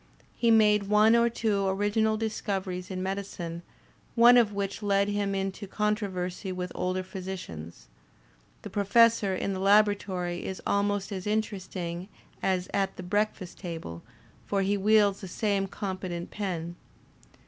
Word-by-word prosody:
He 235 - +2
made 210 -2 +5
one 215 +2 +5
or 235 0 +4
two 220 -3 0
origi 205 +2 +1
nal 220 0 +2
discoveries 195 -4 -3
in 185 -1 -4
medicine, 190 -3 -4 0.5
one 240 +1 +8
of 235 -4 +5
which 200 +1 -3
led 200 -1 +2
him 205 -1 -1
into 195 +1 -3
con 210 +2 +1
troversy 185 -2 -4
with 180 -1 -4
older 185 +1 -1
physicians; 180 - -7 0.8
the - - -6
Professor 205 -1 +4
in 195 +1 -2
the 190 - -4
labo 205 +1 +5
ratory 180 -3 -4
is 190 - -5
almost 200 0 0
as 190 0 -4
interesting 190 -4 -3 0.3
as 185 -1 0
at 195 -1 0
the 185 - -6
breakfast 205 -1 -2
table, 165 - -6 0.5
for 200 -1 +1
he 200 +2 +1
wields 205 0 +3
the 190 - -6
same 200 +1 0
competent 185 -3 -5
pen. 175 -4 -4
195 Hz, 150 wpm, -28 LUFS, 185-210 Hz, 0.8 s, one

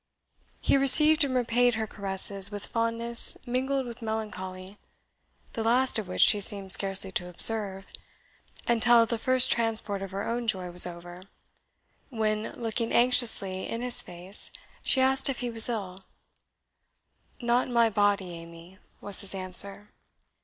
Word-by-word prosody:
He - - +1
received 300 +3 +5
and 265 -2 -3
repaid 245 -1 0
her 220 0 -4
caresses 195 -1 -4
with 205 -1 -9
fondness 230 0 -3
mingled 265 +2 -3
with 240 0 -11
melancholy, 205 -3 -8 0.7
the 225 - -5
last 245 +1 0
of 210 - -8
which 185 - -3
she 210 - +4
seemed 195 -1 +5
scarcely 195 0 +1
to 180 -1 -5
observe, 195 +1 +4 0.8
until 235 0 +3
the 230 0 -5
first 255 +2 +5
transport 220 -3 -1
of 195 - -7
her 195 +2 -6
own 235 0 -5
joy 185 -5 -3
was 180 +1 +7
over, 175 +1 -12 0.9
when, 215 -3 -4
looking 230 0 -5
anxiously 235 -6 +2
in 230 +1 -6
his 250 -1 +1
face, 180 +3 -1 0.3
she 265 - 0
asked 265 +1 +1
if 270 - -5
he 245 -1 -5
was 225 +1 +2
ill. 195 -5 -7 1.4
"Not 240 0 -1
in 250 - -9
my 230 -1 +2
body, 205 -3 -1
Amy," 170 +2 -14 0.2
was 205 -2 -2
his 200 -1 -2
answer. 195 +2 0
220 Hz, 145 wpm, -25 LUFS, 190-240 Hz, 1.4 s, was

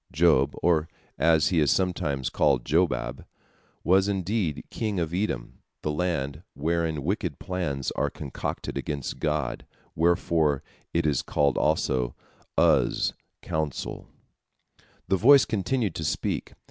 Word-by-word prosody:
" - - -34
Job, 75 -3 +3
or, 80 -2 +3 0.3
as 80 -1 +4
he 90 - +2
is 75 -3 +3
sometimes 75 -8 0
called, 65 -5 +2
Jobab, 70 -6 0 0.6
was, 95 +2 +4
indeed, 95 -4 -1
king 105 -4 -2
of 80 -1 -2
Edom, 90 - -2 0.2
the 75 - 0
land 75 -3 -2
wherein 80 0 -1
wicked 90 -4 -2
plans 85 -8 -3
are - - 0
concocted 70 -3 -5
against 70 -3 -4
God, 75 -5 -1 0.3
wherefore 80 -3 +2 0.3
it 85 -1 0
is 75 -4 +2
called 70 -3 +1
also 65 -5 +1 0.4
Uz, - - +3 0.3
"counsel." 80 -3 -3 1.0
The 95 - +2
voice 135 +7 +7
continued 110 -1 -1
to 80 - -5
speak. 75 - -2
80 Hz, 125 wpm, -26 LUFS, 70-90 Hz, 1.0 s, voice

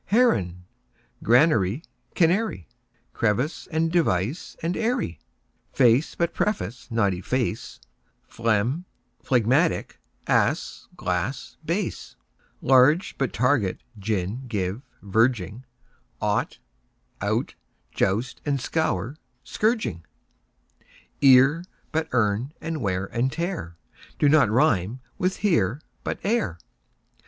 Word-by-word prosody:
Heron; 95 - +2 0.6
granary, 120 - +3 0.3
canary; 175 - +1 0.5
Crevice, 115 +8 -1
and 160 0 0
device, 145 - 0
and 170 +2 0
eyrie; 220 - -1 0.5
Face 125 +3 +3
but 170 -1 0
preface, 125 - -2
but 110 -5 +2
efface, 110 +5 -3 0.5
Phlegm, 115 - 0 0.4
phlegmatic; 130 +7 +1 0.3
ass, - - 0
glass, - - -3
bass; - - -3 0.5
Large, 135 +7 +4
but 135 -3 0
target, 125 -6 +1 0.2
gin, 105 +5 -2
give, 100 -1 -2 0.2
verging; 110 +2 +1 0.5
Ought, - - -1 0.6
out, - - -1 0.4
joust 110 +6 -1
and 140 -2 0
scour, 160 -2 -1
but 155 - -18 0.2
scourging; 215 - -1 1.2
Ear, 135 +4 +6 0.3
but 160 0 -1
earn; 115 +4 +1
and 160 -3 -4
wear 95 -3 -1
and 120 +6 -1
tear 165 - -4 0.4
Do 145 - +3
not 150 -7 +5
rime 115 - +2 0.2
with 185 0 0
"here", 135 - +1 0.2
but - - -2
"ere". 195 - 0
125 Hz, 100 wpm, -25 LUFS, 105-160 Hz, 1.2 s, Ear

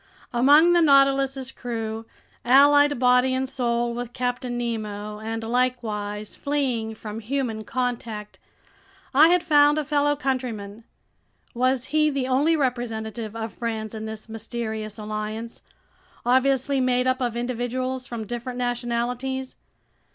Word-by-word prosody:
Among 290 +8 +6
the 345 - +5
Nautilus's 275 -2 +3
crew, 225 -3 -5 0.4
allied 285 +2 +6
body 250 +1 +4
and 260 0 -1
soul 240 -2 -1
with 240 0 -5
Captain 245 -1 -2
Nemo 210 -3 -4
and 225 +1 -4
likewise 220 -4 -2
fleeing 255 -6 -1
from 215 0 -7
human 230 -2 -2
contact, 230 -3 -4 0.7
I 300 +4 +7
had 355 0 +3
found 295 -1 +5
a 305 - -1
fellow 290 0 +2
countryman! 235 -6 -3 0.7
Was 255 +1 +1
he 305 0 +4
the 275 -3 -1
only 285 +6 +3
representative 230 -5 -3
of 225 -1 -5
France 220 -2 -4
in 220 0 -5
this 220 0 -7
mysterious 220 -1 -5
alliance, 215 +2 -5 0.6
obviously 265 +2 +2
made 250 0 +2
up 255 +1 +1
of 240 -2 -1
individuals 255 +1 -3
from 230 -2 -5
different 240 +2 -5
nationalities? 245 +2 -2
245 Hz, 125 wpm, -24 LUFS, 225-265 Hz, 0.7 s, I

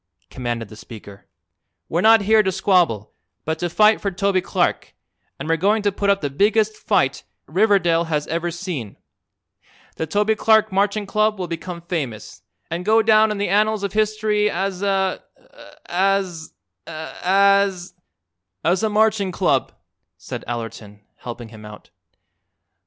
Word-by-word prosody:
commanded 120 -3 -4
the 110 - -13
speaker. 105 -2 -12 0.6
"We're 170 - -1
not 225 +1 +6
here 215 +2 +4
to 190 -2 0
squabble, 180 - +1 0.3
but 160 0 -2
to 175 - -2
fight 215 +5 +4
for 200 - -1
Toby 195 0 0
Clark, - - -1 0.4
and - - -7
we're 165 0 +1
going 205 +5 +1
to 205 - +2
put 200 +1 -1
up 200 0 +2
the 145 - -2
biggest 215 +6 +2
fight - - 0 0.2
Riverdale 175 -6 +2
has 150 -2 -2
ever 170 +1 -2
seen. 170 - -6 1.0
The 160 - -3
Toby 210 +6 +1
Clark 220 0 +3
Marching 200 +2 0
Club 215 +1 +1
will 180 -2 -4
become 170 +1 -6
famous, 140 - -5 0.3
an' 170 +1 -2
go 220 +4 +3
down 220 0 +5
in 210 - -3
the 200 -1 -1
annals 210 +1 +1
of 200 - -3
history 215 -1 +1
as 190 0 -3
a 195 -2 0 0.6
as 185 -3 -1 0.4
as 195 +3 +1 0.4
" 90 +2 -58
"As 180 +4 +2
a 220 - +1
Marching 210 -2 +2
Club," - - 0 0.5
said - - -7
Allerton, 115 -3 -7 0.2
helping 120 -1 -8
him 110 -1 -13
out. 105 0 -12
190 Hz, 150 wpm, -21 LUFS, 160-210 Hz, 1.0 s, not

